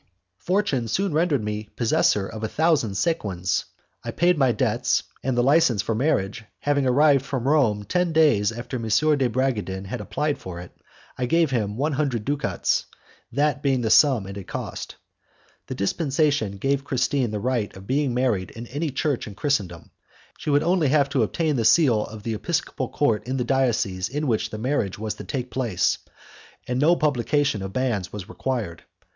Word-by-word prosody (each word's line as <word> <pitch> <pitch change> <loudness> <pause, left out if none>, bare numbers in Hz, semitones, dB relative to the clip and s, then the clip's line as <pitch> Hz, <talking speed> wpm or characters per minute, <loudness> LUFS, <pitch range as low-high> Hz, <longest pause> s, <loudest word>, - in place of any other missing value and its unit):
Fortune 180 - 0
soon 195 - 0
rendered 155 -6 +1
me 105 0 -4
possessor 110 -3 +2
of 110 +1 -8
a - - 0
thousand 150 -7 +1
sequins. 95 - -1 0.4
I - - -5
paid 175 +1 +2
my 135 -5 +3
debts, 120 +1 +1 0.2
and 130 -1 -1
the 120 - +3
licence 130 - +3
for - - -2
the 110 - -1
marriage 110 -7 0 0.2
having 140 -2 +1
arrived 140 +1 +4
from 130 -2 -3
Rome 125 -9 +2
ten 180 - 0
days 145 -11 +4
after 120 +3 -5
M. 115 -2 -5 0.3
de 130 -3 +1
Bragadin 110 -7 -1
had 110 +4 -5
applied 145 +8 -2
for 90 -2 -7
it, 90 - -10 0.5
I 125 - 0
gave 165 +1 +2
him 105 -4 -1
one 145 +4 0
hundred 130 -7 -1
ducats, 145 0 0 0.5
that 145 +2 +1
being 135 -3 +1
the 110 -2 0
sum 130 -6 +5
it 100 +1 -7
had 100 - -8
cost. - - -6 0.7
The - - -5
dispensation 135 - 0
gave 135 +6 0
Christine 130 -1 0
the 105 0 -3
right 120 -2 -1
of 95 - -11
being 135 +3 0
married 120 -8 0
in 115 +1 -9
any 150 +5 -2
church 140 -1 -1
in 100 - -9
Christendom, 100 - -2 0.5
she - - -4
would 145 +1 +3
only 175 -2 +2
have 140 0 +3
to 135 -3 +1
obtain 150 +6 0
the 115 - +1
seal 120 -4 +4
of 110 -1 -10
the 115 -1 -2
episcopal 145 +1 -2
court 115 -6 0
of 130 +1 -1
the 125 - 0
diocese 115 -8 0
in 150 +4 -2
which 110 -4 0
the 110 - -6
marriage 110 -4 -1
was 110 0 -3
to - - -9
take 125 -3 -4
place, 115 -9 0 0.7
and 125 0 -1
no 160 +5 +5
publication 145 - +1
of 95 0 -6
banns 115 -9 -1
was 105 -2 -7
required. 115 -7 -3
125 Hz, 185 wpm, -24 LUFS, 105-145 Hz, 0.7 s, sum